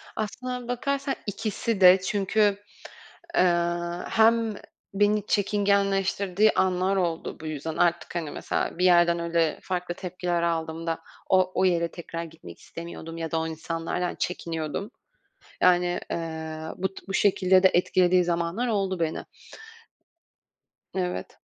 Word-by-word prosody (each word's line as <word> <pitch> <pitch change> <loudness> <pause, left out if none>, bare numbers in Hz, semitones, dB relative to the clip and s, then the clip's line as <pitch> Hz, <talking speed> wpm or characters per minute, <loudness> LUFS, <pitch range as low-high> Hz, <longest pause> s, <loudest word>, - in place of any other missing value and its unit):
Aslına 250 +3 -4
bakarsan, 275 +3 -1
ikisi 210 +1 -2
de. 185 +1 +8
Çünkü, 205 +1 +1 0.8
eee, - - +5 0.7
hem 225 0 +3 0.4
beni 205 +1 +2
çekingenleştirdiği 200 0 +2
anlar 185 +1 +2
oldu, 170 -3 -2
bu 160 - -8
yüzden. 155 +1 -4
Artık, 170 0 +1
hani, 160 -4 -3
mesela, - - -2
bir 180 - +2
yerden 175 -1 +5
öyle 170 -1 0
farklı 180 -1 -3
tepkiler 180 -2 -2
aldığımda 165 0 -2 0.3
o 185 -1 +4
o - - +3
yere 170 -2 +2
tekrar 170 -1 -6
gitmek 165 -1 -12
istemiyordum 165 -1 -8
ya 165 -1 -4
da 165 - +1
o 160 - -2
insanlardan 165 +2 -3
çekiniyordum. 165 - -3 0.7
Yani, 180 0 +3
eee, 160 -1 -4 0.2
bu 190 +1 -1
t - - -12
bu 195 - -4
şekilde 190 -2 +4
de 190 - +6
etkilediği 180 0 +3
zamanlar 175 +7 -1
oldu 195 -5 -1
beni. 160 -1 -1 1.7
Evet. 180 -1 -3
180 Hz, 125 wpm, -26 LUFS, 170-200 Hz, 1.7 s, de